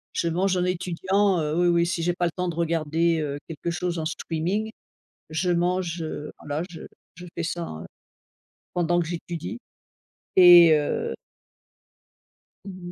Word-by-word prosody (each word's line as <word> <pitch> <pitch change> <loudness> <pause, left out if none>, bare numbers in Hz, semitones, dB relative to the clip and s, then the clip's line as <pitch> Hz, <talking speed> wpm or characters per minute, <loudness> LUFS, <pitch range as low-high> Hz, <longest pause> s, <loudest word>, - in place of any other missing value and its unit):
Je 170 - 0
mange 185 +3 +1
en 180 - +1
étudiant, 185 +2 +1
heu, 150 -1 -1
oui, 175 +1 +3
oui, 170 0 +3
si 170 0 -2
j'ai 175 +1 +1
pas 175 0 -1
le 170 - 0
temps 180 +2 -3
de 170 - -3
regarder, 165 0 +1
heu, 145 -1 -3
quelque 165 +1 -5
chose 175 0 -2
en 155 - -3
streaming. 175 +7 -2 0.6
Je 170 +3 0
mange, 175 0 0
heu, 150 -1 -5
voilà, 145 +2 -3
je 170 -3 -11 0.3
je 180 +1 -10
fais 170 - -1
ça, 170 +1 -3 0.2
heu, - - -10 0.9
pendant 175 0 +1
que 170 - 0
j'étudie 175 +5 -5 0.8
et 175 -2 +9
heu 460 - -2 1.5
Mmh 185 -3 -8
mh. - - -8
175 Hz, 165 wpm, -25 LUFS, 165-180 Hz, 1.5 s, et